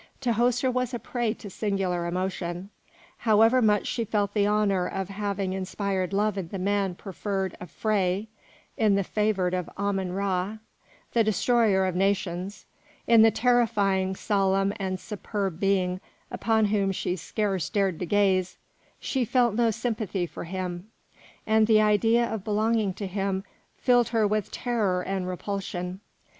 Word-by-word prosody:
Tahoser 245 Hz, +1 st, +1 dB
was 255 Hz, 0 st, -1 dB
a -, -, -1 dB
prey 240 Hz, +1 st, -2 dB
to 205 Hz, -, -10 dB
singular 185 Hz, -4 st, -1 dB
emotion. 180 Hz, +1 st, -3 dB, 0.5 s
However 225 Hz, +3 st, +4 dB
much 210 Hz, -3 st, +3 dB
she 235 Hz, -, -1 dB
felt 205 Hz, -2 st, -1 dB
the 205 Hz, -1 st, +2 dB
honour 205 Hz, -3 st, +2 dB
of 190 Hz, -1 st, -4 dB
having 200 Hz, -1 st, -2 dB
inspired 190 Hz, 0 st, -2 dB
love 205 Hz, 0 st, +1 dB
in 180 Hz, -, -5 dB
the 195 Hz, -, -6 dB
man 195 Hz, -1 st, 0 dB
preferred 195 Hz, -1 st, -3 dB
of 180 Hz, -, -9 dB
Phré, 200 Hz, -2 st, 0 dB, 0.5 s
in 215 Hz, -3 st, +3 dB
the 200 Hz, -, +1 dB
favoured 195 Hz, -3 st, 0 dB
of 180 Hz, -1 st, -2 dB
Ammon 195 Hz, -2 st, -1 dB
Ra, 195 Hz, +1 st, -1 dB, 0.6 s
the 230 Hz, -, +4 dB
destroyer 215 Hz, -2 st, +2 dB
of 185 Hz, -2 st, -1 dB
nations, 195 Hz, 0 st, -1 dB, 0.4 s
in 230 Hz, -1 st, +6 dB
the 225 Hz, -, +8 dB
terrifying, 215 Hz, -5 st, +2 dB
solemn 195 Hz, -1 st, +1 dB
and 185 Hz, -1 st, -3 dB
superb 200 Hz, -4 st, -4 dB
being 185 Hz, -2 st, +1 dB, 0.3 s
upon 220 Hz, 0 st, +2 dB
whom 200 Hz, -2 st, +1 dB
she 180 Hz, -1 st, -2 dB
scarce 190 Hz, 0 st, -2 dB
dared 195 Hz, -5 st, 0 dB
to 180 Hz, -, -3 dB
gaze, 190 Hz, -2 st, +2 dB, 0.4 s
she 265 Hz, -2 st, -1 dB
felt 240 Hz, -1 st, +2 dB
no 230 Hz, +1 st, +2 dB
sympathy 215 Hz, -5 st, -2 dB
for 170 Hz, -, -8 dB
him, 180 Hz, +1 st, -5 dB, 0.6 s
and 220 Hz, 0 st, +3 dB
the 220 Hz, -1 st, +5 dB
idea 225 Hz, +3 st, +3 dB
of 220 Hz, -4 st, -4 dB
belonging 215 Hz, 0 st, +1 dB
to 200 Hz, -, -5 dB
him 195 Hz, 0 st, -2 dB, 0.3 s
filled 245 Hz, -2 st, +3 dB
her 225 Hz, -2 st, +2 dB
with 210 Hz, -1 st, 0 dB
terror 210 Hz, -7 st, -1 dB
and 190 Hz, -1 st, -2 dB
repulsion. 185 Hz, -1 st, -4 dB
200 Hz, 150 wpm, -26 LUFS, 185-220 Hz, 0.6 s, the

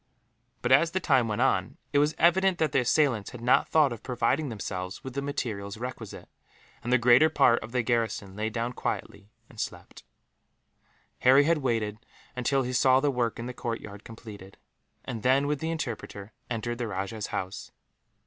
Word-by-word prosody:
But -, -, 0 dB
as 150 Hz, +6 st, +6 dB
the 185 Hz, +3 st, -1 dB
time 130 Hz, -9 st, +2 dB
went 110 Hz, +2 st, -2 dB
on, 135 Hz, -, 0 dB, 0.2 s
it 145 Hz, -, +4 dB
was 150 Hz, +2 st, +2 dB
evident 185 Hz, +2 st, +3 dB
that 155 Hz, -3 st, +1 dB
the -, -, +3 dB
assailants 125 Hz, -4 st, +1 dB
had 125 Hz, -, -10 dB
not 125 Hz, +2 st, +3 dB
thought 150 Hz, -5 st, +4 dB
of 115 Hz, -, -9 dB
providing 130 Hz, +4 st, 0 dB
themselves 95 Hz, -4 st, -5 dB
with 130 Hz, -, -7 dB
the 140 Hz, -, -2 dB
materials 110 Hz, -8 st, -4 dB
requisite, 120 Hz, -2 st, -7 dB, 0.6 s
and 120 Hz, -, -3 dB
the 125 Hz, -, +6 dB
greater 125 Hz, +6 st, +5 dB
part 120 Hz, -6 st, +3 dB
of 110 Hz, -, -9 dB
the 125 Hz, -1 st, 0 dB
garrison 115 Hz, -5 st, -1 dB
lay 110 Hz, +1 st, -2 dB
down 120 Hz, +2 st, -3 dB
quietly 100 Hz, -3 st, -5 dB, 0.2 s
and -, -, -15 dB
slept. -, -, -6 dB, 1.2 s
Harry 130 Hz, +3 st, +6 dB
had 165 Hz, +1 st, +2 dB
waited 115 Hz, -5 st, -1 dB, 0.4 s
until 135 Hz, +2 st, +1 dB
he 125 Hz, 0 st, -4 dB
saw 130 Hz, +1 st, +4 dB
the 145 Hz, +1 st, +1 dB
work 120 Hz, -3 st, -1 dB
in 115 Hz, -, -5 dB
the 125 Hz, -, -5 dB
courtyard 110 Hz, -4 st, -6 dB
completed; 105 Hz, -4 st, -11 dB, 0.5 s
and 115 Hz, -3 st, -5 dB
then, 130 Hz, +4 st, +3 dB
with 145 Hz, 0 st, -1 dB
the 160 Hz, -, -3 dB
interpreter, 115 Hz, -9 st, -5 dB, 0.2 s
entered 120 Hz, 0 st, -3 dB
the 120 Hz, -, -2 dB
rajah's 100 Hz, +2 st, -4 dB
house. 95 Hz, +1 st, -5 dB
120 Hz, 180 wpm, -27 LUFS, 110-140 Hz, 1.2 s, as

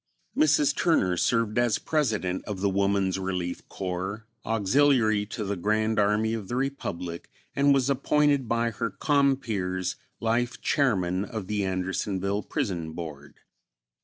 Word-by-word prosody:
Mrs. 300 Hz, 0 st, +3 dB
Turner 95 Hz, -, +2 dB
served 115 Hz, +4 st, +1 dB
as 120 Hz, -3 st, +2 dB
President 110 Hz, -, -1 dB
of 105 Hz, -3 st, -5 dB
the 100 Hz, 0 st, +1 dB
Woman's 100 Hz, -1 st, +1 dB
Relief 90 Hz, -2 st, -4 dB
Corps, 95 Hz, +3 st, -4 dB, 0.2 s
Auxiliary 110 Hz, -1 st, +2 dB
to 110 Hz, 0 st, -4 dB
the 100 Hz, 0 st, -2 dB
Grand 110 Hz, +3 st, +1 dB
Army 105 Hz, +2 st, +2 dB
of 110 Hz, -4 st, -4 dB
the 120 Hz, -, -3 dB
Republic, 90 Hz, -11 st, -4 dB, 0.3 s
and 140 Hz, +1 st, +4 dB
was 135 Hz, -2 st, +3 dB
appointed 140 Hz, 0 st, +2 dB
by 115 Hz, 0 st, +1 dB
her 115 Hz, +1 st, -2 dB
compeers 115 Hz, -, 0 dB
as -, -, -10 dB, 0.2 s
Life 120 Hz, +2 st, 0 dB
Chairman 95 Hz, -9 st, +1 dB
of 110 Hz, -3 st, -5 dB
the 105 Hz, +1 st, -1 dB
Andersonville 95 Hz, +1 st, -1 dB
Prison 85 Hz, -6 st, -3 dB
Board. 75 Hz, -4 st, -8 dB
105 Hz, 135 wpm, -27 LUFS, 95-120 Hz, 0.3 s, and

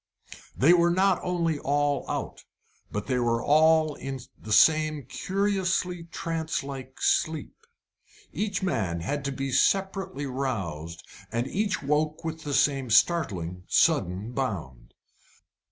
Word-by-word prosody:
They 150 Hz, +7 st, +6 dB
were 175 Hz, -1 st, +4 dB
not 185 Hz, +1 st, +3 dB
only 170 Hz, -4 st, -1 dB
all 145 Hz, -1 st, 0 dB
out, -, -, -4 dB, 0.5 s
but 105 Hz, 0 st, -3 dB
they 130 Hz, -2 st, 0 dB
were 115 Hz, -1 st, +1 dB
all 155 Hz, +1 st, +4 dB
in 135 Hz, -1 st, -6 dB, 0.2 s
the 110 Hz, -, -10 dB
same 155 Hz, +4 st, +4 dB
curiously 185 Hz, -, -1 dB
trance 165 Hz, -2 st, -3 dB
like 135 Hz, -1 st, -8 dB
sleep. 160 Hz, -1 st, 0 dB, 0.8 s
Each 200 Hz, -2 st, -2 dB
man 95 Hz, -, -1 dB
had 140 Hz, -, -3 dB
to 140 Hz, -, -1 dB
be 135 Hz, 0 st, -3 dB
separately 190 Hz, 0 st, +1 dB
roused, 95 Hz, -, -4 dB, 0.3 s
and 115 Hz, +2 st, -1 dB
each 200 Hz, +5 st, -1 dB
woke 150 Hz, +3 st, 0 dB
with 160 Hz, 0 st, -4 dB
the 145 Hz, -2 st, -2 dB
same 135 Hz, -4 st, +2 dB
startling, 100 Hz, -, +2 dB
sudden 95 Hz, +6 st, +2 dB
bound. 85 Hz, -, -5 dB
145 Hz, 125 wpm, -27 LUFS, 120-165 Hz, 0.8 s, They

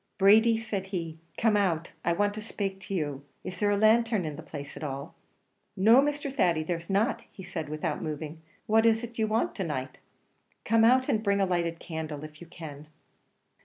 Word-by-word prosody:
"Brady," 220 Hz, +3 st, +6 dB
said 205 Hz, -4 st, -4 dB
he, 165 Hz, -4 st, -4 dB, 0.2 s
"come 225 Hz, -2 st, +3 dB
out; 180 Hz, -5 st, +1 dB
I 170 Hz, -, +2 dB
want 205 Hz, +3 st, +1 dB
to 215 Hz, -, -6 dB
spake 195 Hz, -3 st, -4 dB
to -, -, -4 dB
you. 145 Hz, -5 st, -2 dB, 0.2 s
Is 180 Hz, -1 st, -7 dB
there 205 Hz, -, +2 dB
a 205 Hz, -, +2 dB
lanthern 220 Hz, -2 st, +3 dB
in 150 Hz, -2 st, -4 dB
the 160 Hz, -, -8 dB
place 145 Hz, -3 st, -8 dB
at -, -, -8 dB
all?" 140 Hz, +1 st, -5 dB, 0.6 s
"No, 225 Hz, +7 st, +7 dB
Mr. 290 Hz, -1 st, -2 dB
Thady, 170 Hz, -, +2 dB
there 170 Hz, +2 st, -1 dB
is 170 Hz, +2 st, -13 dB
not," 220 Hz, +4 st, +1 dB, 0.2 s
said 175 Hz, -3 st, -4 dB
he, 150 Hz, -, -10 dB
without 155 Hz, 0 st, -2 dB
moving; 155 Hz, +1 st, -5 dB, 0.2 s
"what 220 Hz, +1 st, +4 dB
is 225 Hz, +1 st, +3 dB
it 235 Hz, -1 st, -7 dB
you 220 Hz, -, +2 dB
want 220 Hz, +2 st, 0 dB
to 195 Hz, -, -1 dB
night?" 135 Hz, -5 st, -4 dB, 0.7 s
"Come 225 Hz, +1 st, +4 dB
out, 255 Hz, +3 st, +5 dB
and 215 Hz, -, +1 dB
bring 200 Hz, -2 st, +1 dB
a 195 Hz, -, +3 dB
lighted 170 Hz, -2 st, -1 dB
candle, 155 Hz, -3 st, -5 dB
if 155 Hz, +1 st, -10 dB
you 175 Hz, -, -10 dB
can." 155 Hz, -3 st, -9 dB
190 Hz, 205 wpm, -28 LUFS, 160-220 Hz, 0.7 s, No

